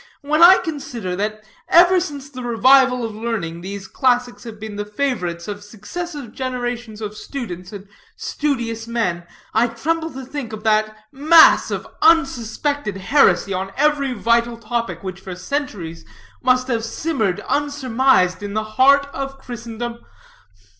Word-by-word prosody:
When 305 +3 +1
I 360 +2 +10
consider 245 - -5
that, 215 +1 -3 0.3
ever 355 +2 +6
since 290 -6 -5
the 260 -3 -9
revival 250 +1 +4
of 225 - -5
learning, 210 -7 -4
these 195 +1 -7
classics 245 +3 0
have 220 -2 -9
been 215 -1 -7
the 205 - -3
favorites 205 -7 -3
of 205 0 -6
successive 260 - -7
generations 245 -4 -4
of 210 0 -5
students 185 -8 -7
and 200 -1 -9 0.3
studious 235 -6 -3
men, 180 -8 -2 0.3
I 225 +2 +3
tremble 320 +8 -2
to 265 0 -7
think 255 -4 -6
of 215 -1 -7
that 215 0 +1
mass 310 +4 +6
of - - -4
unsuspected 285 - +1
heresy 195 -3 +3
on 190 +1 -4
every 285 -2 +2
vital 235 +1 +1
topic 225 -6 -3
which 190 -1 -6
for 185 -1 -8
centuries 180 - -4 0.4
must 255 0 +2
have 230 -3 -1
simmered 225 - -2
unsurmised 265 -10 +1
in 205 0 -5
the 215 - 0 0.2
heart 280 +2 +6
of 270 0 -5
Christendom. 235 -2 -7
235 Hz, 145 wpm, -20 LUFS, 210-275 Hz, 0.4 s, I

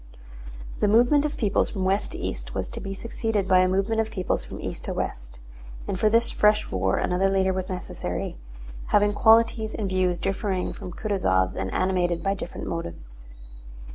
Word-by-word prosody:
The - - +2
movement 245 +7 +4
of 300 - -3
peoples 205 -4 +1
from 190 -3 -3
west 195 +2 0
to - - -5
east - - -5
was - - -2
to - - -6
be 195 - -6
succeeded 225 -2 -2
by 185 -1 +5
a 185 - +4
movement 195 +4 +1
of 220 - -3
peoples 185 -4 -2
from - - -9
east - - -6
to - - -3
west, - - -4 0.5
and 185 - -2
for 215 - +4
this 230 +2 +3
fresh 210 0 +2
war 95 0 +1
another 185 +2 +1
leader 190 -1 +2
was 185 0 -3
necessary, 180 - -4 0.5
having 205 0 +3
qualities 225 0 +4
and 210 - -2
views 185 -1 +1
differing 195 0 -2
from 180 - -8
Kutúzov's 130 - 0
and 95 0 -3
animated 180 -2 0
by 195 - +1
different 190 -3 -6
motives. - - -7
190 Hz, 180 wpm, -25 LUFS, 180-210 Hz, 0.5 s, by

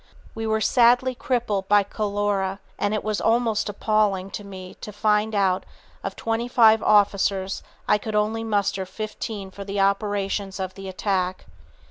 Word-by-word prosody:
We 225 0 -4
were 220 0 +1
sadly 245 +3 +4
crippled 235 -6 -1
by 205 0 +5
cholera, 200 -1 -1 0.2
and 205 - +1
it 215 - -2
was 215 -1 -1
almost 225 -2 +1
appalling 205 -2 0
to 205 - -6
me 185 -2 -9
to 210 - -7
find 210 +1 +1
that - - +2
out 185 -1 +1 0.4
of 195 0 -4
twenty 225 +1 -2
seven 225 -3 +5
officers 200 -2 +2 0.3
I 210 - +4
could 215 +1 -5
only 215 +2 +1
muster 200 -3 0
fifteen 210 0 -6
for 200 - -8
the 200 0 -4
operations 200 0 0
of 185 -1 -3
the 195 -1 -8
attack. 185 -1 -1
205 Hz, 160 wpm, -24 LUFS, 195-220 Hz, 0.4 s, by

